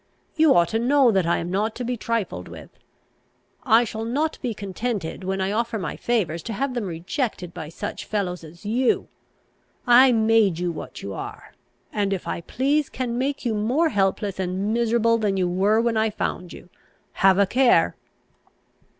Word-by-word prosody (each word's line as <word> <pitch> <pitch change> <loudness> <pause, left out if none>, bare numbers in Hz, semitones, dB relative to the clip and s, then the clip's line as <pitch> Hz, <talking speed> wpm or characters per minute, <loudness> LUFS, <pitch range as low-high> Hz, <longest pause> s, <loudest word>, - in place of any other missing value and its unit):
You 315 -2 +5
ought 170 -1 +4
to 225 - 0
know 260 +1 +4
that 190 -4 +1
I 170 - +2
am 170 +1 -4
not 215 +3 -1
to 250 - -4
be 245 +1 -2
trifled 230 -2 -3
with. - - -11 0.9
I 240 -6 +5
shall 220 -1 -5
not 285 +8 -1
be 250 - -2
contented, 200 -2 -4
when 190 +1 -2
I 190 +1 0
offer 230 +1 -1
my 175 -7 -4
favours, 185 -9 -1
to 225 - -5
have 265 +5 -2
them 240 -4 -2
rejected 180 - -3
by 160 -4 -7
such 205 +5 -6
fellows 180 -5 -3
as 165 +4 -14
you. 240 +4 +1 0.8
I 250 +1 +7
made 220 -5 +3
you 175 0 -1
what 160 - -8
you 100 - -5
are; - - -8 0.4
and, 200 -2 0
if 190 - -5
I - - -3
please, 280 - 0
can 245 -2 -3
make 275 +1 -2
you 235 - +1
more 250 +11 +1
helpless 195 -2 0
and 190 +3 -1
miserable 230 0 +2
than 205 -3 0
you 185 -1 +1
were 195 +5 +2
when 230 -1 +1
I 220 0 +2
found 180 -4 -4
you. - - -12 0.4
Have 190 -1 +4
a 200 - +5
care!" 250 +5 +3
215 Hz, 185 wpm, -23 LUFS, 190-240 Hz, 0.9 s, I